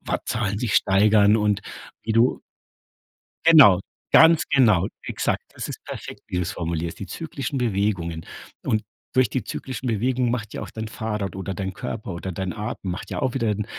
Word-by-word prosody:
Wattzahlen 105 -3 -2
sich 110 -3 -1
steigern 105 +2 +5
und 105 -2 +1 0.4
wie 110 - -2
du 115 +3 +3 1.1
Genau, 140 - +8 0.3
ganz 160 0 +7
genau, 105 -9 +4 0.2
exakt. - - -1
Das - - -5
ist - - -8
perfekt, - - -8
wie 90 - -3
du's 90 -1 -1
formulierst, 85 0 -3
die 100 - -5
zyklischen 140 - -4
Bewegungen, 95 -8 -1 0.4
und 110 -1 +1 0.3
durch 130 -4 +3
die 130 - -2
zyklischen 130 +4 -5
Bewegungen 120 +2 +1
macht 110 -4 -3
ja - - -5
auch - - -6
dein 110 0 -6
Fahrrad 105 -4 -4
oder 95 0 -4
dein 95 -1 -4
Körper 100 - -5
oder 95 +2 -5
dein 95 0 -3
Atem 105 -3 -4
macht 90 - -6
ja - - -3
auch 130 -2 0
wieder 115 -5 0
'n 105 0 -1
105 Hz, 175 wpm, -24 LUFS, 95-120 Hz, 1.1 s, Genau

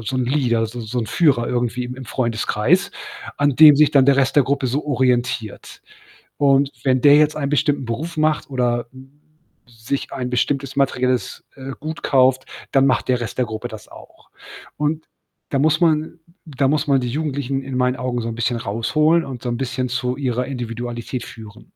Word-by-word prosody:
'n - - -10
so 130 - -2
'n 130 - 0
Leader, 120 -4 +1
so 120 +2 -8
so 115 +2 -4
'n 115 - -2
Führer 135 -7 +2
irgendwie 125 0 -1
im 125 +1 -6
im 130 0 -9
Freundeskreis, 120 - 0 0.5
an 145 0 +2
dem 150 0 +8
sich 150 0 +5
dann 135 -2 +5
der 140 -1 +5
Rest 135 -1 +2
der 145 - +7
Gruppe 135 0 -1
so 135 +5 -2
orientiert 125 -5 -1 0.6
und 140 -1 +3
wenn 130 -1 +2
der 145 0 +7
jetzt 150 0 +3
einen 140 -2 -2
bestimmten 145 -1 +1
Beruf 155 +9 -4
macht 155 -1 0
oder, 120 -2 -1
hm, 130 +1 -15 0.5
sich 120 +3 -5
ein 125 -1 -3
bestimmtes 135 +2 -1
materielles, 130 -2 0
äh, 135 0 -7
Gut 160 +1 -6
kauft, 130 -1 +3 0.3
dann 135 0 +4
macht 130 - +1
der 125 -1 +1
Rest 115 0 -6
der 125 - +1
Gruppe 110 -1 -5
das 110 -2 -11
auch - - -16 0.5
und 150 +1 -2 0.4
da 135 - 0
muss 155 +3 +2
man 160 0 +1 0.3
da 140 -3 0
muss 150 +2 0
man 135 -2 +3
die 125 - -3
Jugendlichen 140 -1 -2
in 135 -1 -6
meinen 125 0 +1
Augen 125 -1 -3
so 115 - -4
'n 115 - -4
bisschen 120 0 -1
rausholen 150 +10 +1
und 130 -3 -8
so 125 - -4
'n 120 - -2
bisschen 130 -1 -2
zu 125 0 -2
ihrer 125 -2 -2
Individualität 120 -1 -5
führen. 110 -3 -12
130 Hz, 195 wpm, -20 LUFS, 120-145 Hz, 0.6 s, dem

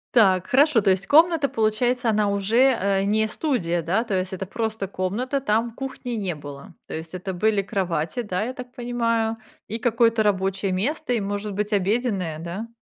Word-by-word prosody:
Так, 190 -5 +5
хорошо, 270 0 +4
то 195 - +3
есть 190 +1 0
комната, 320 -1 +5
получается, 235 +3 0
она 210 -1 +2
уже, 230 +6 +3
э, 195 0 +1
не 215 +2 +2
студия, 200 - -1
да? 190 +8 0
То 215 - -4
есть 185 0 -1
это 190 +1 -4
просто 220 0 -3
комната, 215 +9 -2
там 230 -1 +1
кухни 265 0 -6
не 185 -6 -2
было, 145 -1 -9 0.2
то - - -8
есть 160 +2 -6
это 185 +1 -4
были 210 +2 +1
кровати, 180 -1 -2
да, 185 -1 -2
я 250 +3 -3
так 250 -2 -9
понимаю, 230 -2 0 0.3
и 225 +2 -4
какое-то 230 -1 +2
рабочее 195 -1 0
место 250 +8 -1
и, 235 - +1
может 205 +1 -3
быть, 210 +1 -2
обеденная, 195 -5 0
да? 180 +7 -5
210 Hz, 185 wpm, -24 LUFS, 190-240 Hz, 0.3 s, Так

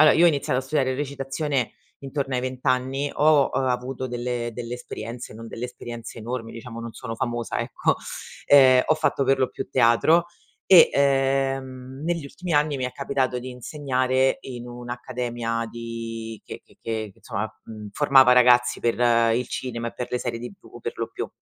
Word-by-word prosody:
allora: 155 0 +8
io 170 - +5
ho - - +8
iniziato 145 -4 0
a - - -9
studiare 135 -1 0
recitazione, 135 -1 -2 0.3
intorno 135 -1 -3
ai 125 - +1
20 130 0 -5
anni, 130 +2 +1
ho 150 -2 +4
avuto 130 0 -1
delle 120 -1 -3
delle 120 0 -5
esperienze, 120 -1 -7
non 115 +1 -9
delle 115 - -6
esperienze 120 -1 -8
enormi, 115 0 -5
diciamo, 115 0 -8
non 115 0 -7
sono 115 - -6
famosa 120 -1 -2
ecco. - - 0 0.5
Ehm, 130 -3 +7
ho 155 - +4
fatto 145 -3 +1
per 135 0 +3
lo 130 - +1
più 135 - -6
teatro 135 +8 +4 0.4
e, 180 -3 +9
ehm, 135 -1 0
negli 170 -2 -1
ultimi 175 +5 -6
anni 145 0 +2
mi 130 - -2
è 125 - -3
capitato 135 -2 -1
di 130 +1 -7
insegnare 130 0 0
in 120 -2 -7
un'accademia 120 -1 -4
di 115 -1 -6
che - - -8
che - - -24
che 110 -2 -3
insomma, 110 -4 -4 0.2
uhm, 105 -2 -8
formava 135 -1 +6
ragazzi 125 -1 +5
per 115 - +1 0.4
il 125 +1 -1
cinema, 120 -2 -4
e - - -10
per 125 - -4
le 125 - 0
serie 115 - -4
TV 120 - -11
per - - -4
lo - - -3
più. - - -5
125 Hz, 175 wpm, -24 LUFS, 120-135 Hz, 0.5 s, e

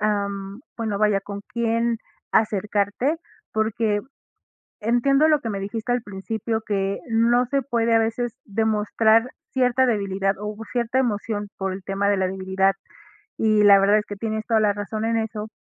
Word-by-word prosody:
am, 200 -1 -2 0.2
bueno, 220 -3 -2
vaya, 210 -2 +3
¿con 200 +1 -7
quién 230 0 0 0.3
acercarte? 210 - +1 0.3
Porque 220 -1 0 0.8
entiendo 260 +7 +3
lo 305 -1 +4
que 230 - -4
me 200 - -3
dijiste 220 +4 -4
al 245 -1 0
principio, 220 +2 -3
que 195 -1 -1
no 235 +2 +3
se 275 +2 0
puede 235 -3 +1
a 225 - +5
veces 225 +1 -1
demostrar 220 +2 +2 0.3
cierta 260 0 +3
debilidad 195 -3 0
o 210 0 -4 0.2
cierta 245 +1 0
emoción 210 -3 -1
por 190 -1 -2
el 190 - -8
tema 195 +1 -1
de 205 - +2
la 190 -1 +1
debilidad, 190 +1 +1 0.7
y 215 -1 +3
la 200 -1 +8
verdad 200 +2 +4
es 210 - -3
que 205 - -6
tienes 220 +1 -3
toda 225 -2 +3
la 210 -1 +3
razón 215 +1 -4
en 230 0 +1
eso, 220 -1 -3
215 Hz, 165 wpm, -23 LUFS, 200-230 Hz, 0.8 s, la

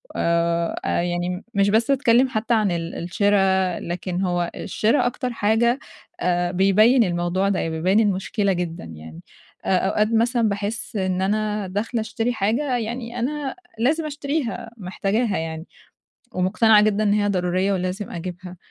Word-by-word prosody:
آآ، 170 0 +1
أ - - +1
يعني 175 +1 -2
مش 200 0 +3
بس 225 +5 +2
باتكلم 260 -2 +4
حتى 225 0 -1
عن 215 -4 +2
ال 170 0 -3
الشرا، 190 0 +1
لكن 180 +1 -4
هو 175 -2 0
الشرا 220 +8 +1
أكتر 250 0 -2
حاجة 230 +4 +2 0.4
آآ، 175 0 0
بيبين 210 +7 +4
الموضوع 175 +1 0
ده 195 - 0
يع - - -1
بيبين 175 +6 +2
المشكلة 200 -1 +1
جدًا 175 -2 -4
يعني. 80 0 -10 0.4
آآ 190 - +3
أوقات 210 +3 +1
مثلًا 230 0 +2
باحس 205 +2 -4
إن 185 -2 0
أنا 210 +1 -1
داخلة 220 +5 -2
أشتري 225 +2 -2
حاجة 240 +6 0
يعني 235 +1 -4
أنا 280 +2 -2 0.2
لازم 305 +7 +1
أشتريها، 285 -5 -3
محتاجاها 200 +2 -1
يعني، 160 0 -4 0.7
ومقتنعة 210 +4 +4
جدًا 215 0 +2
إن 205 -1 +3
هي 205 -1 +2
ضرورية 185 0 +1
ولازم 185 +2 -3
أجيبها، 180 +1 -7
200 Hz, 150 wpm, -22 LUFS, 180-230 Hz, 0.7 s, باتكلم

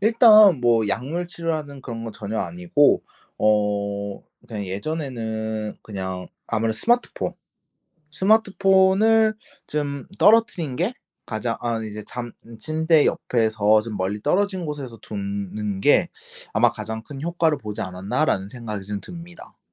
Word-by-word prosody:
일단 215 - +7
뭐 115 -2 +3
약물 140 - -2
치료하는 155 -5 -4
그런 115 -2 -6
건 115 - -6
전혀 105 +1 -5
아니고 175 -4 +2 0.4
어 100 -1 0 0.2
그냥 105 -2 -5
예전에는 110 - -4
그냥 95 -3 -5 0.2
아무래도 110 0 0
스마트폰 240 +1 0 0.8
스마트폰을 200 +3 +4 0.3
쫌 145 -2 -3
떨어뜨린 200 - +3
게 195 +9 0 0.3
가장 115 +1 -2
아 115 -2 -1
이제 105 0 -6
잠 120 -1 -6 0.3
침대 160 +2 +2
옆에서 110 -2 +2
좀 110 -3 -5
멀리 95 +3 -2
떨어진 185 - 0
곳에서 135 -6 -6
둔 100 -2 -5
는 105 -2 -3
게 - - +4 0.4
'아마 - - +4
가장 110 0 -6
큰 135 +2 -9
효과를 165 -2 +1
보지 105 -4 -6
않았나?'라는 95 +3 -1
생각이 110 -3 -6
좀 105 0 -4
듭니다. 175 -1 -11
120 Hz, 275 characters per minute, -23 LUFS, 105-170 Hz, 0.8 s, 일단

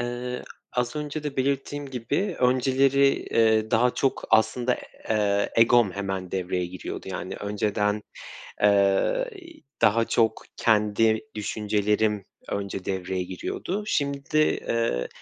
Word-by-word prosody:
Eee, 120 +1 -4 0.3
az 125 +4 -1
önce 150 0 -4
de 145 -2 -5
belirttiğim 140 +2 -1
gibi 160 - -2
önceleri, 135 +2 +4 0.2
eee, 110 -1 +3
daha 120 +2 +3
çok 135 - 0
aslında, 120 +3 +3 0.3
eee, 100 -2 +1
egom 115 -3 +5
hemen 95 -2 -4
devreye 90 -1 -1
giriyordu. 90 +1 -7
Yani, - - -5
önceden, 105 0 -1 0.6
eee, 100 - +3 0.5
daha 115 +2 +4
çok 110 -2 +1
kendi 110 0 +3
düşüncelerim 105 0 0 0.3
önce 100 -2 -3
devreye 95 -1 -2
giriyordu. 175 - -4
Şimdi, 140 -1 -1
eee, 115 - +1
110 Hz, 110 wpm, -25 LUFS, 100-130 Hz, 0.6 s, egom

